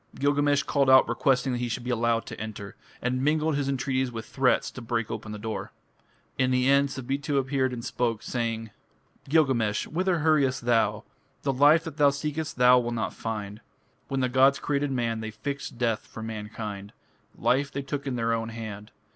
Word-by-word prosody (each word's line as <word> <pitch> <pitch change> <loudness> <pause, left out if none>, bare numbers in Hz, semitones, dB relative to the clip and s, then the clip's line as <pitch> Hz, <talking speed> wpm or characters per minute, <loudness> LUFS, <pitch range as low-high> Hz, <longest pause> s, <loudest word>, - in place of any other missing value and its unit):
Gilgamesh 145 0 +2
called 140 -2 +1
out 130 0 +7
requesting 130 -1 +1
that 120 - -2
he 120 0 -2
should 120 +2 -3
be 125 - -2
allowed 115 -1 +1
to - - -8
enter, 105 -2 -7 0.3
and 130 +1 0
mingled 155 +1 +2
his 140 -1 -1
entreaties 130 -1 -1
with 115 -1 -6
threats 130 +2 +1
to 130 - -9
break 115 -1 -2
open 110 0 -5
the 105 - -5
door. 110 +1 -5 0.7
In 130 -1 +3
the 125 0 +2
end 140 +1 +4
Sabitu 135 +3 -2
appeared 130 -1 +1
and 120 -2 -6
spoke, 115 -3 -1
saying: 115 -2 -3 0.6
Gilgamesh, 130 -9 +2
whither 180 +2 0
hurriest 140 -5 +2
thou? 115 -2 +2 0.4
The 135 - +1
life 145 +5 +5
that 165 -3 -8
thou 145 -2 +6
seekest 150 +2 -3
thou 125 0 +7
wilt 120 -1 -2
not 115 - -2
find. 105 -1 -5 0.5
When 135 -1 -1
the 130 - +2
gods 130 +2 +4
created 145 0 -1
man 115 -3 -1
They 110 0 -4
fixed 140 +3 -5
death 115 -3 -1
for 110 - -8
mankind. 105 -2 -6 0.4
Life 140 +3 +1
they 140 +1 -4
took 140 +1 -4
in 130 - -1
their 115 -1 0
own 115 0 -2
hand. 110 -2 -7
125 Hz, 190 wpm, -27 LUFS, 115-140 Hz, 0.7 s, out